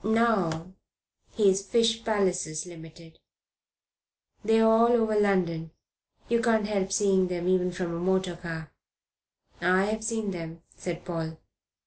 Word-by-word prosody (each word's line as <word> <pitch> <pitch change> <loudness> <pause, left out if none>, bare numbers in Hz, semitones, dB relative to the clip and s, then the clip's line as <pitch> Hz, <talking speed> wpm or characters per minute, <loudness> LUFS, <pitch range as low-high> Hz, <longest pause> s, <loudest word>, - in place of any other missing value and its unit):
Now 195 -6 +1 0.6
he's 195 -3 +3
'Fish 230 +2 +1
Palaces, 185 -7 0
Limited.' 165 -1 -13 1.2
They're 225 +1 +4
all 225 +1 +5
over 225 -2 +2
London. 175 -6 +1 0.5
You 235 0 +2
can't 225 -3 +2
help 195 -2 -1
seeing 195 -2 +3
them 180 -1 -3
even 180 -1 +2
from 175 -1 -4
a 170 - -3
motor 185 0 0
car." 165 -3 -7 0.9
"I've 200 +4 +1
seen 220 -2 -2
them," 165 -2 -7
said 175 -2 -6
Paul. 165 -2 -4
190 Hz, 120 wpm, -27 LUFS, 170-220 Hz, 1.2 s, all